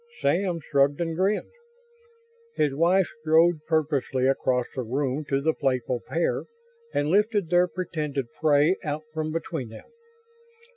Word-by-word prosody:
Sam 175 +4 +1
shrugged 140 -1 +1
and 165 -1 -2
grinned. 195 +4 0 1.0
His 145 -3 +1
wife 175 +5 +3
strode 160 +1 +4
purposefully 145 -5 0
across 130 -2 +1
the 130 - -3
room 135 +4 -2
to 135 0 +1
the 160 +2 +2
playful 130 -3 -1
pair 170 +1 -1 0.5
and 145 - 0
lifted 205 -1 +2
their 175 0 +4
pretended 155 -7 -3 0.2
prey 155 +3 +4
out 150 -1 -3
from 155 -1 -2
between 160 -6 -4
them. 110 - -12
155 Hz, 135 wpm, -26 LUFS, 140-170 Hz, 1.0 s, strode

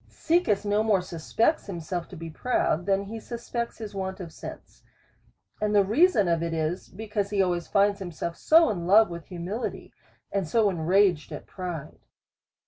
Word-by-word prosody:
Caecus 315 - +1
no 205 +1 +2
more 210 -4 +2
suspects 215 - 0
himself 175 -1 -4
to 190 - -11
be 165 -1 -7
proud, 180 -3 0
than 195 0 +2
he 220 +3 -7
suspects 235 +1 -5
his 215 -2 -7
want 190 0 -4
of 170 -4 -8
sense. - - -10 0.8
And 210 0 +1
the 200 -1 +5
reason 230 - +4
of 170 -1 +1
it 165 -1 -2
is, 160 +3 -2
because 205 0 -3
he 205 -1 -1
always 175 -3 +1
finds 200 0 +2
himself 170 -2 -5 0.2
in 220 - +5
love 210 0 +6
with 170 -1 -8
humili 185 +6 -3
ty, - - -13 0.4
and 195 -4 -1
so 210 +4 +3
enraged 175 -1 +2
at - - -7
pride. 175 -6 -6
195 Hz, 170 wpm, -26 LUFS, 175-215 Hz, 0.8 s, love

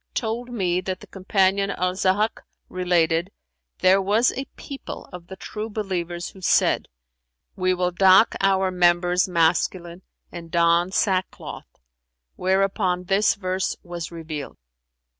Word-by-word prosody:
told 235 +2 -2
me 185 -6 0
that 185 0 -4
the - - -12
Companion 195 0 +1
Al 180 -2 -1
Zahhαk 195 +4 0 0.3
related: 175 -1 +1 0.5
'There 190 +1 +5
was 210 +5 +2
a 270 - -5
people 275 -1 -8
of 175 -1 -9
the 190 - -8
True 215 +3 -6
believers 180 -5 -4
who 190 - -15
said, 175 - +2 0.7
'We 185 -1 +1
will 180 0 0
dock 190 +3 +5
our 190 -1 +2
members 175 0 +3
masculine 170 +1 0 0.3
and 170 -1 -9
don 170 +1 +3
sackcloth;' 190 -2 -2 0.6
whereupon 190 -1 0
this 195 +3 +2
verse 185 -1 -2
was 175 -2 -6
revealed. 155 -4 -7
185 Hz, 125 wpm, -23 LUFS, 175-195 Hz, 0.7 s, There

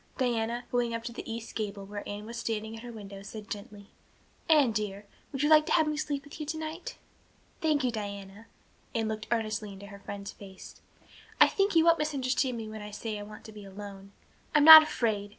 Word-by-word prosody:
Diana, 240 -2 -1
going 235 -2 0
to 235 +1 -7
the 230 - -7
east 230 0 -6
gable, 205 -2 -4
where 205 +1 -6
Anne 205 +1 -6
was 230 +2 -8
standing 220 -1 -3
at 225 - -9
her 240 0 -8
window, 200 -3 -9
said 210 +1 -10
gently: 205 -1 -8 0.6
"Anne 295 -7 +5
dear, 205 -1 -3 0.3
would 270 0 -2
you 295 - +3
like 310 -1 +6
to - - +1
have 320 -2 +4
me 305 - -1
sleep 290 -2 -3
with 290 +2 -12
you 305 - -4
tonight?" 320 +9 -5 0.6
"Thank 305 -3 +2
you, 250 - +1
Diana." 200 0 -7 0.5
Anne 225 -1 0
looked 215 0 -4
earnestly 215 -3 -1
into 195 +1 -10
her 200 0 -11
friend's 200 0 -7
face. 190 -2 -13 0.6
"I - - +10
think 395 -2 0
you 325 0 +5
won't 335 0 +5
misunderstand 265 -4 0
me 225 -1 -6
when 215 0 -8
I 210 - -7
say 210 0 -5
I - - -6
want 210 +1 -10
to 220 - -11
be 210 -1 -11
alone. 195 0 -10 0.4
I'm 300 - +6
not 315 0 +14
afraid. 220 -9 -1
225 Hz, 210 wpm, -29 LUFS, 205-275 Hz, 0.6 s, not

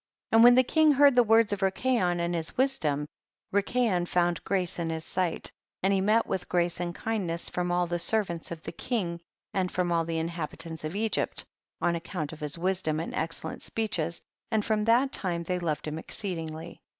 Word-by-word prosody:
20. - - +3
And - - +9
when 245 0 +9
the 255 - +6
king 310 +3 +4
heard 285 0 +6
the 245 - +6
words 225 -2 +4
of 200 - -4
Rikayon 190 -2 +1
and 170 0 0
his 165 -1 -3
wisdom, 160 - +1 0.5
Rikayon 200 -3 +1
found 175 -1 +1
grace 185 -3 -1
in 165 -1 -1
his 160 0 -3
sight, 180 -3 -1 0.3
and 195 +1 +3
he 195 - +2
met 215 +4 +3
with 185 - -3
grace 175 -1 +1
and 175 -1 -3
kindness 185 -7 -2
from 180 0 -1
all 175 0 +2
the 175 0 -2
servants 180 -4 0
of 170 -1 -7
the - - -5
king 175 -9 -3 0.3
and 185 -2 0
from 180 -1 0
all 165 -1 +2
the 165 0 -3
inhabitants 165 -1 -4
of 155 +4 -4
Egypt, 220 +1 -1 0.4
on 175 -1 +2
account 165 -2 -4
of 155 - -10
his 150 +2 -4
wisdom 175 -3 0
and 165 - -4
excellent 160 0 -3
speeches, 175 -7 -2 0.3
and 220 -2 +1
from 215 -1 +1
that 245 +4 +4
time 170 -3 -1
they 180 +1 -1
loved 155 -3 -2
him 155 +1 -3
exceedingly. 165 -3 -5
175 Hz, 200 wpm, -28 LUFS, 165-215 Hz, 0.5 s, And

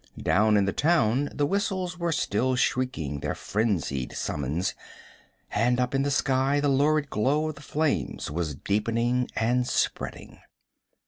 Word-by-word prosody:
Down 105 +6 +3
in 100 - +3
the 100 - -1
town 145 -4 +2
the 145 - 0
whistles 185 0 -1
were 170 -1 0
still 130 -3 0
shrieking 125 - -1
their - - -3
frenzied 90 - -1
summons, 75 +6 -2 0.8
and 120 +3 +2
up 125 +1 0
in 135 - +2
the 140 - 0
sky 135 0 +2
the 145 0 +1
lurid 145 +2 +2
glow 145 +8 +1
of - - -4
the 140 - -14
flames 150 - -1
was 80 -2 -2
deepening 115 - 0
and 125 +2 +1
spreading. - - -2
125 Hz, 145 wpm, -26 LUFS, 105-145 Hz, 0.8 s, Down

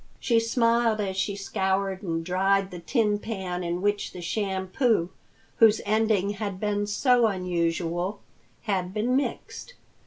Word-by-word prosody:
She 235 -3 +2
smiled 230 -1 +2
as 195 -2 -2
she 195 +1 -1
scoured 195 -1 -1
and 165 -3 -3
dried 195 +2 +1
the 180 - -7
tin 210 +2 +1
pan 190 -5 -4
in 175 +2 -3
which 205 0 0
the 180 - -8
shampoo, 190 +1 0 0.5
whose 220 -1 +6
ending 215 -2 +2
had 200 -2 -4
been 205 0 -1
so 240 +2 +3
unusual, 175 0 -1 0.4
had 190 -3 -2
been 235 +4 +1
mixed. 285 - -3
200 Hz, 135 wpm, -26 LUFS, 185-220 Hz, 0.5 s, whose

